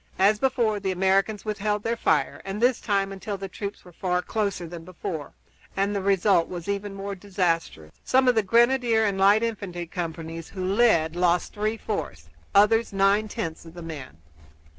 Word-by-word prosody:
As 205 Hz, +2 st, +4 dB
before 235 Hz, -5 st, +1 dB
the 195 Hz, -1 st, -2 dB
Americans 195 Hz, +3 st, +1 dB
withheld 210 Hz, 0 st, -1 dB
their 230 Hz, +1 st, 0 dB
fire, -, -, +1 dB
and 195 Hz, +2 st, -5 dB
this 245 Hz, +1 st, +2 dB
time 195 Hz, -2 st, 0 dB
until 195 Hz, +1 st, -5 dB
the 195 Hz, 0 st, -5 dB
troops 200 Hz, +2 st, -7 dB
were 180 Hz, -, -13 dB
far 180 Hz, +1 st, -1 dB
closer 200 Hz, -5 st, -2 dB
than 170 Hz, 0 st, -8 dB
before, 165 Hz, -3 st, -6 dB, 0.4 s
and 200 Hz, +1 st, +1 dB
the 200 Hz, -, -1 dB
result 195 Hz, -2 st, +3 dB
was 175 Hz, -1 st, -7 dB
even 200 Hz, 0 st, -3 dB
more 200 Hz, +1 st, -5 dB
disastrous. 175 Hz, -, -2 dB
Some 260 Hz, 0 st, +3 dB
of 250 Hz, -, +6 dB
the 225 Hz, -, +3 dB
grenadier 235 Hz, +1 st, +3 dB
and 195 Hz, -2 st, -1 dB
light 200 Hz, +3 st, +5 dB
infantry 195 Hz, -6 st, -3 dB
companies 165 Hz, -1 st, -6 dB
who 185 Hz, -2 st, -5 dB
led 185 Hz, -6 st, +3 dB
lost 175 Hz, 0 st, +1 dB
three 215 Hz, +2 st, -1 dB
fourths, 80 Hz, -, -5 dB, 0.3 s
others 225 Hz, +3 st, +4 dB
nine 200 Hz, +2 st, +3 dB
tenths 165 Hz, -5 st, -5 dB
of 165 Hz, 0 st, -13 dB
their 175 Hz, -, -8 dB
men. 150 Hz, -, -8 dB
195 Hz, 180 wpm, -25 LUFS, 175-215 Hz, 0.4 s, of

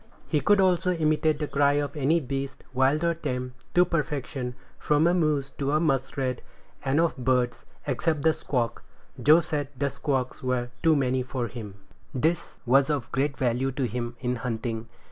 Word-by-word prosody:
He 150 Hz, -, +1 dB
could 205 Hz, +8 st, +4 dB
also 180 Hz, -1 st, +3 dB
imitate 155 Hz, -2 st, +2 dB
the 150 Hz, 0 st, -2 dB
cry 140 Hz, 0 st, +3 dB
of 145 Hz, +1 st, -1 dB
any 150 Hz, +3 st, +2 dB
beast, 135 Hz, -1 st, -4 dB
wild 135 Hz, +5 st, +2 dB
or 170 Hz, 0 st, +3 dB
tame, 125 Hz, -6 st, -4 dB, 0.2 s
to 180 Hz, 0 st, +6 dB
perfection, 140 Hz, -6 st, -2 dB, 0.2 s
from 150 Hz, +1 st, +2 dB
a 175 Hz, -, +4 dB
moose 150 Hz, -5 st, +1 dB
to 140 Hz, 0 st, 0 dB
a 155 Hz, -, +4 dB
muskrat; 135 Hz, -4 st, 0 dB, 0.4 s
and 135 Hz, +3 st, +2 dB
of 170 Hz, 0 st, +2 dB
birds, 125 Hz, -1 st, 0 dB, 0.2 s
except 145 Hz, +2 st, 0 dB
the 160 Hz, 0 st, +5 dB
squawk; 120 Hz, -6 st, -2 dB, 0.4 s
Joe 155 Hz, +4 st, +7 dB
said 145 Hz, -4 st, -2 dB
the 140 Hz, +1 st, 0 dB
squawks 135 Hz, -2 st, -2 dB
were 125 Hz, -1 st, -1 dB
too 160 Hz, -1 st, +5 dB
many 130 Hz, -2 st, +1 dB
for 125 Hz, -1 st, -3 dB
him. 105 Hz, -3 st, -8 dB, 0.4 s
This 160 Hz, +6 st, +2 dB
power -, -, -20 dB
was 135 Hz, +3 st, +4 dB
of 145 Hz, -6 st, -1 dB
great 140 Hz, +1 st, 0 dB
value 130 Hz, +1 st, +1 dB
to 135 Hz, -, -2 dB
him 120 Hz, 0 st, -3 dB
in 125 Hz, 0 st, -1 dB
hunting. 115 Hz, -1 st, -3 dB
140 Hz, 180 wpm, -27 LUFS, 125-155 Hz, 0.4 s, Joe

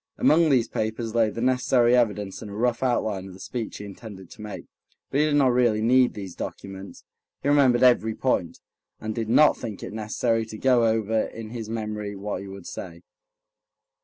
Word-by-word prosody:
Among 160 Hz, +1 st, +4 dB
these 130 Hz, -5 st, +3 dB
papers 110 Hz, +1 st, -3 dB
lay 115 Hz, -2 st, +3 dB
the 115 Hz, -, -6 dB
necessary 125 Hz, -1 st, +3 dB
evidence 105 Hz, -5 st, 0 dB
and 105 Hz, -, -8 dB
a 100 Hz, -, -8 dB
rough 120 Hz, +2 st, 0 dB
outline 110 Hz, -7 st, 0 dB
of 95 Hz, -, -11 dB
the -, -, -14 dB
speech 115 Hz, +2 st, -5 dB
he 105 Hz, -, -8 dB
intended 100 Hz, -2 st, -11 dB
to -, -, -12 dB
make. 105 Hz, -1 st, -7 dB, 0.5 s
But 140 Hz, -, +1 dB
he 150 Hz, -, +4 dB
did 150 Hz, -, +1 dB
not 140 Hz, -3 st, +4 dB
really 120 Hz, -3 st, +3 dB
need 125 Hz, +2 st, +4 dB
these 95 Hz, -4 st, -7 dB
documents. 95 Hz, +2 st, -8 dB, 0.4 s
He 140 Hz, -, +1 dB
remembered 135 Hz, -4 st, +4 dB
every 110 Hz, -3 st, +4 dB
point, 95 Hz, -10 st, -1 dB, 0.4 s
and 110 Hz, 0 st, -4 dB
did 110 Hz, 0 st, -3 dB
not 150 Hz, +6 st, +5 dB
think 105 Hz, -4 st, -7 dB
it -, -, -7 dB
necessary 110 Hz, +1 st, -1 dB
to 110 Hz, -, -8 dB
go 125 Hz, -1 st, +3 dB
over 110 Hz, 0 st, +1 dB
in 110 Hz, -1 st, -8 dB
his 115 Hz, -3 st, -6 dB
memory 105 Hz, -2 st, -4 dB
what 100 Hz, +1 st, -4 dB
he 100 Hz, -, -8 dB
would 95 Hz, -2 st, -10 dB
say. 85 Hz, -2 st, -8 dB
110 Hz, 195 wpm, -25 LUFS, 105-125 Hz, 0.5 s, not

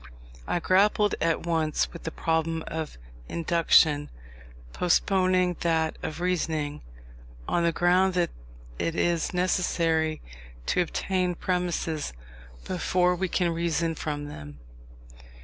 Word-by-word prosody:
I 175 Hz, -, 0 dB
grappled 205 Hz, +4 st, +3 dB
at 165 Hz, 0 st, +1 dB
once 160 Hz, -2 st, 0 dB
with 170 Hz, -, -10 dB
the 160 Hz, -, -2 dB
problem 160 Hz, 0 st, -1 dB
of 160 Hz, -, -5 dB, 0.3 s
Induction, 160 Hz, -3 st, +3 dB, 0.6 s
postponing 185 Hz, 0 st, +2 dB
that 160 Hz, -2 st, +1 dB
of 155 Hz, +1 st, -5 dB
Reasoning, 160 Hz, -4 st, -1 dB, 0.7 s
on 170 Hz, -, +1 dB
the 170 Hz, -, +3 dB
ground 180 Hz, +2 st, +3 dB
that 175 Hz, -1 st, +1 dB, 0.5 s
it 165 Hz, -, -1 dB
is 170 Hz, -2 st, +1 dB
necessary 165 Hz, -3 st, +1 dB, 0.5 s
to 180 Hz, -, +2 dB
obtain 180 Hz, +1 st, -1 dB
premises 170 Hz, -, -2 dB, 0.5 s
before 180 Hz, 0 st, +1 dB
we 190 Hz, +2 st, -1 dB
can 175 Hz, -1 st, +1 dB
reason 165 Hz, 0 st, 0 dB
from 150 Hz, -2 st, -4 dB
them. 75 Hz, -, -9 dB
170 Hz, 115 wpm, -27 LUFS, 160-180 Hz, 0.7 s, grappled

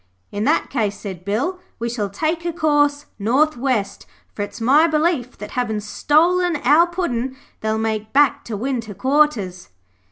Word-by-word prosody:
'In 205 Hz, +2 st, -2 dB
that -, -, +1 dB
case,' 215 Hz, -6 st, -1 dB
said 190 Hz, -4 st, -7 dB
Bill, 255 Hz, -, -1 dB, 0.2 s
'we 235 Hz, -, -3 dB
shall 225 Hz, -4 st, -2 dB
take 320 Hz, -, -2 dB
a 345 Hz, -, -1 dB
course 295 Hz, -3 st, +1 dB
north 265 Hz, +9 st, +2 dB
west, 240 Hz, -5 st, -2 dB, 0.3 s
for -, -, -5 dB
it's 205 Hz, -, -5 dB
my 280 Hz, +8 st, +5 dB
belief 305 Hz, -5 st, 0 dB
that 210 Hz, -, -8 dB
havin' 230 Hz, -4 st, -1 dB
stolen 335 Hz, -, +2 dB
our 310 Hz, +6 st, +5 dB
Puddin' 265 Hz, -8 st, -3 dB, 0.2 s
they'll 220 Hz, 0 st, -1 dB
make 220 Hz, -1 st, -2 dB
back 280 Hz, -2 st, +3 dB
to 220 Hz, -3 st, -4 dB
winter 230 Hz, -3 st, -3 dB
quarters.' 240 Hz, -7 st, +1 dB
255 Hz, 160 wpm, -20 LUFS, 215-305 Hz, 0.3 s, my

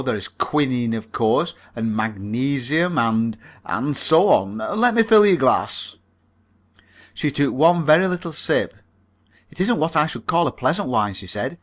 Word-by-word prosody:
There -, -, -1 dB
is -, -, -5 dB
quinine, 125 Hz, -6 st, -1 dB
of 110 Hz, 0 st, -8 dB
course, 115 Hz, +11 st, 0 dB, 0.2 s
and 115 Hz, -2 st, -3 dB
magnesium, 130 Hz, -, -2 dB
and 115 Hz, -2 st, 0 dB, 0.3 s
and 145 Hz, +1 st, -3 dB
so 160 Hz, +8 st, +4 dB
on. 100 Hz, +2 st, +2 dB
Let 220 Hz, -, 0 dB
me 230 Hz, -, +5 dB
fill 220 Hz, -1 st, +6 dB
your 185 Hz, -3 st, +4 dB
glass." 130 Hz, -4 st, 0 dB, 1.2 s
She 150 Hz, -, -2 dB
took 145 Hz, 0 st, 0 dB
one 165 Hz, +3 st, +3 dB
very 160 Hz, +5 st, +5 dB
little 180 Hz, -2 st, -5 dB
sip. -, -, -1 dB, 0.8 s
"It -, -, -6 dB
isn't 230 Hz, +5 st, +1 dB
what 160 Hz, +1 st, -1 dB
I 150 Hz, 0 st, +3 dB
should -, -, -8 dB
call 170 Hz, +1 st, +1 dB
a -, -, -2 dB
pleasant 185 Hz, -6 st, -2 dB
wine," 105 Hz, -4 st, 0 dB
she 95 Hz, 0 st, -8 dB
said. 125 Hz, -, -4 dB
145 Hz, 170 wpm, -20 LUFS, 115-170 Hz, 1.2 s, fill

